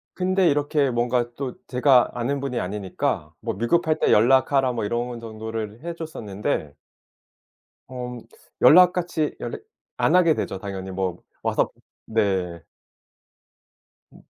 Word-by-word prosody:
근데 185 -1 +2
이렇게 145 -1 +1
뭔가 120 0 0
또 135 -3 -4
제가 125 -1 +4
아는 130 +3 -1
분이 130 -3 -2
아니니까 90 -5 -3
뭐 - - -3
"위급할 155 - +1
때 - - +2
연락하라." 130 +3 +4
뭐 115 -3 -2
이런 120 +2 -2
정도를 110 0 -6
해 170 0 -4
줬었는데 105 - -4 1.1
음 125 -1 -6 0.4
연락같이 175 -2 +5
연락 - - -6 0.3
안 - - +2
하게 170 -4 +5
되죠 95 - -3
당연히. 95 -1 -6
뭐 95 -2 -2 0.2
와서 - - +1 0.4
네. 95 -6 0 1.5
음. - - -17
120 Hz, 240 characters per minute, -24 LUFS, 105-145 Hz, 1.5 s, 연락같이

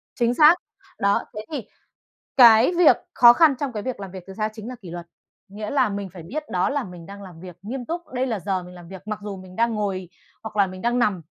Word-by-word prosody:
chính 240 -1 +1
xác. 310 +5 +7 0.4
Đó, 200 0 +2
thế 215 0 -6
thì 275 -7 -5 0.7
cái 235 +4 +7
việc 350 - +7 0.2
khó 240 -1 +8
khăn 305 +1 +5
trong 275 -3 -2
cái 210 -2 -4
việc 255 -5 -5
làm 195 -2 -7
việc 185 -2 -9
từ 190 - -10
xa 215 +1 -1
chính 220 +1 -9
là 255 - -6
kỷ 175 - -9
luật, 175 0 -7 0.4
nghĩa 210 +2 -6
là 280 - +2
mình 200 -1 -4
phải 175 -3 -10
biết 300 - -5
đó 180 0 +1
là 285 -2 -1
mình 180 -3 -11
đang 200 0 -10
làm 175 -4 -12
việc 180 -2 -10
nghiêm 245 +4 -5
túc, 340 +2 -5
đây 255 +1 0
là 220 -6 -2
giờ 190 -2 -2
mình 180 0 -12
làm 175 -1 -12
việc, 190 +2 -11
mặc 215 -1 -3
dù 205 -2 -6
mình 185 0 -13
đang 230 0 +1
ngồi 190 -4 -3 0.3
hoặc 215 -1 -8
là 200 -1 +4
mình 185 0 -9
đang 240 +1 +1
nằm 200 -7 +1
210 Hz, 260 wpm, -23 LUFS, 185-240 Hz, 0.7 s, khó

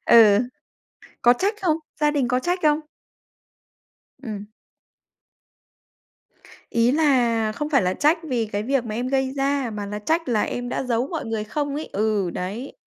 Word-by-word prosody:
Ừ. 215 -3 +7 0.8
Có 240 +1 +6
trách 410 +3 +1
không? 325 -4 +2 0.2
Gia 295 - +4
đình 280 -5 +1
có 250 +2 +1
trách 355 +6 -1
không? 300 0 +3 1.4
Ừm. 210 -5 -6 2.2
Ý 235 +1 +3
là 240 -8 +2
không 295 +4 -3
phải 270 -8 +4
là 180 +1 0
trách 305 +3 +3
vì 235 -4 0
cái 205 0 -3
việc 260 +1 0
mà 215 -2 -5
em 245 +2 -2
gây 265 -1 +1
ra, 275 -3 0
mà 210 -1 -5
là 210 +1 -4
trách 320 +7 -1
là 220 -3 +2
em 245 0 -3
đã - - -2
giấu 245 0 0
mọi 325 -3 -4
người 220 -1 -2
không 285 +5 -3
ấy? 310 - -5
Ừ, 205 -3 0
đấy. 205 +11 -5
245 Hz, 170 wpm, -23 LUFS, 215-290 Hz, 2.2 s, Ừ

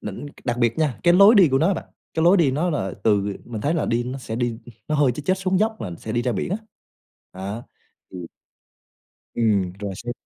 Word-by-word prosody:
đỉnh 105 +7 -7 0.2
đặc 120 -2 -1
biệt 120 +1 +1
nha, 150 -8 0
cái 175 0 +5
lối 200 +5 +8
đi 190 -7 +7
của 135 - +2
nó 165 - +3
á 195 - +2
bạn, - - -6 0.3
cái 160 - 0
lối 175 +4 +6
đi 165 -7 +3
nó 155 +7 0
là 95 - -2
từ, 105 -2 +2
ờ - - -20
mình 115 -3 -6
thấy 145 +8 0
là 160 - 0
đi 120 +1 0
nó 130 +2 -5
sẽ 110 -3 -6
đi, 120 -2 -2 0.3
nó 155 - 0
hơi 145 -4 +3
chếch 145 +4 -8
chếch 185 +3 +2
xuống 185 0 0
dốc 220 +2 0
là 100 - -4
sẽ 110 - -6
đi 120 +1 0
ra 125 0 0
biển 100 - -3
á. 195 - 0 0.8
Đó, 100 +5 -6 0.5
ừm. 90 -2 -7 1.1
Ừm, 100 -6 +1
rồi 100 -1 -4
xong 120 +4 -5
125 Hz, 245 wpm, -23 LUFS, 110-165 Hz, 1.1 s, lối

